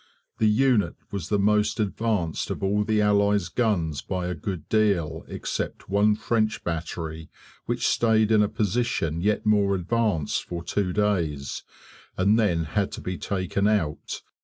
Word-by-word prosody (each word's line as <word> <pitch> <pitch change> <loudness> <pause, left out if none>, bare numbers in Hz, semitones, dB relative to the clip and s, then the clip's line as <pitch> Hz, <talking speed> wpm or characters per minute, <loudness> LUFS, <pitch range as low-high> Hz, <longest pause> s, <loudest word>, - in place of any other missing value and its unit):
The 110 - +4
unit 105 -6 +2 0.2
was 95 -5 -4
the 105 - +2
most 105 +2 +2
advanced 105 -5 -1
of - - -4
all 100 +2 +2
the 105 0 +1
Allies' 100 -3 +2
guns 85 - 0
by 90 -2 -3
a 90 - -2
good 85 -1 -5
deal 100 -8 +1
except - - -4
one 105 +2 +3
French 110 0 0
battery 80 -1 -4 0.4
which - - -1
stayed 110 -1 +3
in 110 -1 +5
a 105 - +2
position 105 -7 -1
yet 105 +3 0
more 100 -2 +3
advanced 95 -4 0
for 85 -1 -5
two 95 0 -1
days, 85 -10 -1 0.6
and 100 +4 +3
then 90 -7 +2
had 95 +6 -1
to - - -6
be 90 0 -4
taken 100 +1 -1
out. 90 -9 -1
100 Hz, 155 wpm, -25 LUFS, 85-105 Hz, 0.6 s, in